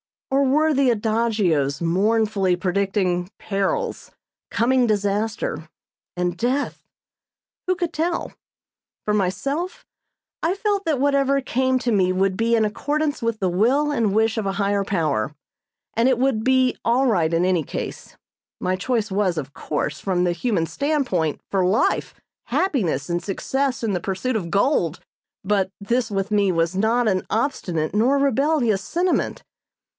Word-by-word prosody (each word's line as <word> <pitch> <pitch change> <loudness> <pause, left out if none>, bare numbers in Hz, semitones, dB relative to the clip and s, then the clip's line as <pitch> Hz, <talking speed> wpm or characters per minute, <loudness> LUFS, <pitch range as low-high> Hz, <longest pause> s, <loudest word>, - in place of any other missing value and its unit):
Or 275 +1 +3
were 305 +4 +3
the 275 -2 +3
adagios 210 - +1
mournfully 195 +2 +2
predicting 185 -1 0
perils, 465 - -2 0.4
coming 250 +1 +2
disaster 205 -6 -1 0.5
and 180 -1 0
death? 255 +8 -1 0.8
Who 370 - +2
could 345 -2 -3
tell? 335 +2 -2 0.7
For 210 - +1
myself, 275 - -2 0.6
I 340 +4 +1
felt 405 -1 -1
that 305 -5 +1
whatever 275 0 +2
came 260 0 +1
to 245 -1 -1
me 185 -4 +3
would 190 +1 +1
be 230 +3 +2
in 220 -1 +3
accordance 290 +8 -1
with 230 -1 -1
the 190 - +1
will 255 +11 +2
and 220 -8 +1
wish 220 +1 +2
of 215 -3 -1
a 195 - -1
Higher 200 0 0
Power, 150 - -1 0.6
and 235 +3 +3
it 255 - +2
would 250 -4 +1
be 260 0 +3
all 245 +3 +2
right 175 -10 +2
in 170 +2 +2
any 180 -3 +2
case. - - -6 0.4
My 185 - 0
choice 220 +2 -1
was, 190 -3 +1
of 140 -2 -5
course, 150 0 -3
from 180 -2 0
the 175 - +2
human 175 -1 0
standpoint, 250 - -1
for 195 -2 +2
life, 190 +5 +1 0.3
happiness 195 - 0
and 175 0 -1
success 260 +6 -2
in 225 - 0
the 180 - 0
pursuit 195 +8 -2
of 175 -5 -4
gold; 195 - +1 0.4
but 195 -1 +1
this 235 +4 0
with 195 0 -2
me 200 -2 +3
was 165 +1 0
not 225 +4 +2
an 190 -3 +1
obstinate 180 - -1
nor 240 +7 +3
rebellious 275 -5 +2
sentiment. 350 - -1
215 Hz, 150 wpm, -22 LUFS, 185-260 Hz, 0.8 s, Or